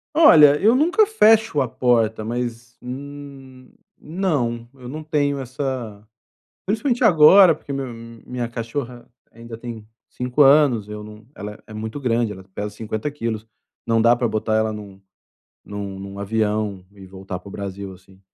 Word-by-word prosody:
Olha, 150 - +7
eu 220 +4 +5
nunca 355 +9 +3
fecho 220 - +4
a 130 - -2
porta. 115 -3 +1
Mas, 120 0 -5
hum, 135 0 -10 0.3
não, 145 -10 -2
eu 130 -2 -13
não 155 +4 -6
tenho 145 -2 0
essa 125 -5 -5 0.6
principalmente, 225 +5 0
agora 175 +2 +7
porque 145 -2 -8
meu 135 -1 -3 0.4
minha 125 -1 -4
cachorra 120 +1 -6 0.3
ainda 115 0 -10
tem 115 -2 -8 0.2
5 125 +3 -1
anos, 135 -6 +4
eu 105 0 -7
não 105 +1 -13
ela 105 0 -8
é 110 - -11
muito 110 +5 -5
grande 120 -4 0
ela 95 -1 -9
pesa 105 0 -3
50 110 +5 -4
quilos. 115 -6 -4 0.4
Não 115 -1 +2
dá 120 +1 +5
pra 120 0 0
botar 110 0 -1
ela 110 0 +1
em 105 - -6
um 100 -2 -13 0.6
em - - -12 0.3
um 100 0 -9
avião 105 -2 -1
e 100 -2 -13
voltar 95 -1 -8
para 100 - -13
o - - -12
Brasil, 100 -1 -6
assim. 95 +1 -19
120 Hz, 160 wpm, -21 LUFS, 110-145 Hz, 0.6 s, Olha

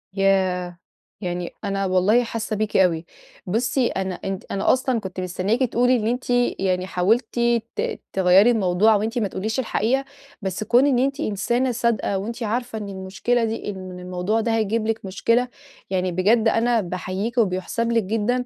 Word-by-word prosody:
ياه! 185 -2 +1 0.4
يعني 175 -2 -4
أنا 195 -1 -1
والله 190 +6 +3
حاسّة 230 -2 -3
بيكِ 215 0 -1
أوي. 170 -3 +2 0.4
بُصّي، 245 +5 +1
أنا 190 -3 -3
أنتِ 195 +1 -5
أنا 195 - +2
أصلًا 255 -2 0
كنت 190 -3 -7
مستنّياكِ 185 +5 -1
تقولي 245 +1 +3
إن 220 -3 -1
أنتِ 250 +2 -2 0.3
يعني 185 -1 0
حاولتِ 205 +7 +2 0.5
ت 460 0 -2
تغيّري 190 +4 +5
الموضوع، 210 0 +3
وأنتِ 220 +4 -1
ما 215 - 0
تقوليش 220 +6 -3
الحقيقة. 255 +2 0 0.4
بس 190 +1 -3
كون 245 +5 +4
إن 260 -4 +3
أنتِ 275 +2 0
إنسانة 240 +1 0
صادقة، 235 -4 0
وأنتِ 230 +5 -4
عارفة 235 +2 -2
إن 205 -2 -5
المشكلة 195 +5 -1
دي 225 -1 -4
إن 190 -2 -6
من 180 0 -8
الموضوع 180 +5 -1
ده 225 0 0
هيجيب 220 0 0
لِك 225 -2 -2
مشكلة، 230 +6 +1 0.4
يعني 185 -1 0
بجد 215 +6 +3
أنا 230 +1 +2
باحييكِ، 185 +5 -4
وبيُحسَب 225 +2 0
لِك 230 -1 +2
جدًا 225 +5 0
215 Hz, 165 wpm, -23 LUFS, 190-235 Hz, 0.5 s, تغيّري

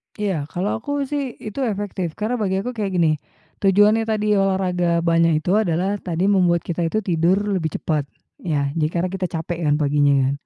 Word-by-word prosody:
Iya, 190 -9 -2
kalau 190 +7 -2
aku 285 +5 -2
sih 275 -2 -3
itu 215 +5 -6
efektif 195 -5 -3
karena 230 +3 -2
bagi 195 -2 0
aku 250 - -3
kayak 210 -5 -3
gini, 165 -3 +3 0.5
tujuannya 205 +3 +4
tadi 210 -1 +1
olahraga 180 -3 +1
banyak 165 -2 +3
itu 180 - 0
adalah 190 +1 0
tadi 180 +2 -1
membuat 175 -4 +3
kita 170 -1 -2
itu 215 +6 -1
tidur 175 -1 +2 0.2
lebih 160 -6 -1
cepat 150 -3 -1 0.3
ya, 145 -5 -1
jadi 155 -1 +2
karena 180 +1 0
kita 190 -1 -2
capek 165 0 -4
kan 145 - +3
paginya. 145 -2 +2
180 Hz, 180 wpm, -21 LUFS, 165-205 Hz, 0.5 s, tujuannya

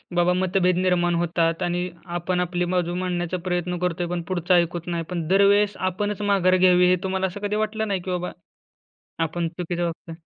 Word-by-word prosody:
बाबा 175 +1 +3
मतभेद 180 -1 +1
निर्माण 180 -1 +2
होतात 165 -1 0
आणि 175 +1 -1 0.3
आपण 180 +1 -1
आपली 180 0 -1
बाजू 175 -1 0
मांडण्याचा 180 -1 -2
प्रयत्न 180 0 -1
करतो 180 -1 -1
आहे 175 - -4
पण 175 -1 -1
पुढचं 180 0 +1
ऐकत 175 0 0
नाही? 170 -1 -2
पण 170 -3 -3
दरवेळेस 200 +2 +4 0.2
आपणच 205 +2 -3
माघार 195 -3 +3
घ्यावी. 180 -1 +5
हे 185 - +5
तुम्हाला 190 0 0
असं 185 +2 -7
कधी 210 - -2
वाटलं 215 +1 -1
नाही, 195 -2 -1
की 185 - -5
बाबा, 180 0 -2 0.9
आपण 165 +1 -2
चुकीचं 175 +1 -4
वागतो 170 0 -5
आहे? 165 - -13
180 Hz, 190 wpm, -24 LUFS, 175-185 Hz, 0.9 s, घ्यावी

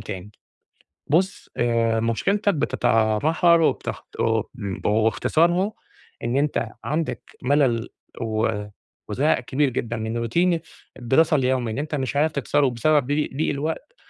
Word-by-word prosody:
تاني. 100 0 -7 0.8
بُص، 185 +7 0
آآ 115 -1 +2
مشكلتك 195 - +1
بتتمحور 140 +6 +2
وبتخ 160 - -1
وب 115 -1 +1 0.4
واختصارها 165 - +2 0.5
إن 120 +3 0
أنت 145 +1 0
عندك 155 +2 -2 0.2
مَلَل 125 -4 +2 0.3
و 110 -1 0 0.6
وزهق - - +2
كبير 145 +1 0
جدًا 120 -2 -3
من 110 +1 -3
روتين 170 +10 +1 0.4
الدراسة 150 +7 +3
اليومي 130 -4 +1
إن 110 - -5
أنت 150 +2 -2
مش 135 -1 -3
عارف 155 +2 +2
تكسره 140 0 +1
بسبب 130 +3 +2
ضي 145 +2 0
ضِيق 155 - +1
الوقت 160 - -4
135 Hz, 125 wpm, -23 LUFS, 115-155 Hz, 0.8 s, الدراسة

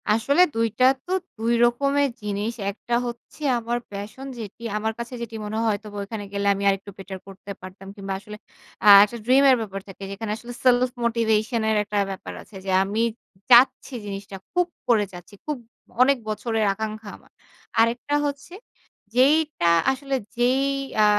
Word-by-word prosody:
আসলে 235 +10 +3
২ 230 0 +2
টা 255 - +6 0.2
তো 360 - -7 0.3
২ 230 +2 0
রকমের 280 +4 +2
জিনিস। 210 +2 -2 0.2
একটা 230 +4 -7
হচ্ছে 240 +5 -9 0.2
আমার 235 +1 -2
passion, 205 +6 -7
যেটি 220 +1 -8
আমার 220 +1 -1
কাছে 235 +2 -6
যেটি 230 -1 -6
মনে 210 +1 -4
হয় 225 - 0
হয়তোবা 210 0 -4
ওইখানে 205 +1 -6
গেলে 200 0 -1
আমি 200 0 -4
আরেকটু 195 +1 -2
বেটার 190 -1 -8
করতে 195 +1 -10
পারতাম 185 +1 -11
কিংবা 195 -2 -5
আসলে 210 +1 -10 0.5
আ - - +4 0.2
একটা 210 +3 -2
dream 260 +3 +5
এর 260 - +7
ব্যাপার 195 -3 -5
থাকে, 195 0 -10
যেখানে 210 +2 -4
আসলে 240 +1 -9
self 250 0 +4
motivation 230 -1 +1
এর 220 - +2
একটা 210 0 -4
ব্যাপার 190 - -7
আছে 210 - -17
যে 190 - -1
আমি 205 +3 -1 0.5
চাচ্ছি 250 +2 +6
জিনিসটা 195 -1 -6 0.2
খুব 355 -1 +1 0.2
করে 220 -4 +4
চাচ্ছি, 175 +3 -12
খুব 300 -2 -2 0.4
অনেক 275 +2 +5
বছরের 220 0 -1
আকাঙ্ক্ষা 215 +1 -5
আমার। - - -25 0.5
আরেকটা 240 +5 +2
হচ্ছে, 285 +3 -5 0.6
যেইটা 285 - +3 0.2
আসলে 275 +1 -3 0.2
যেই 250 +3 +3 0.4
আ - - +6
225 Hz, 165 wpm, -24 LUFS, 205-250 Hz, 0.6 s, এর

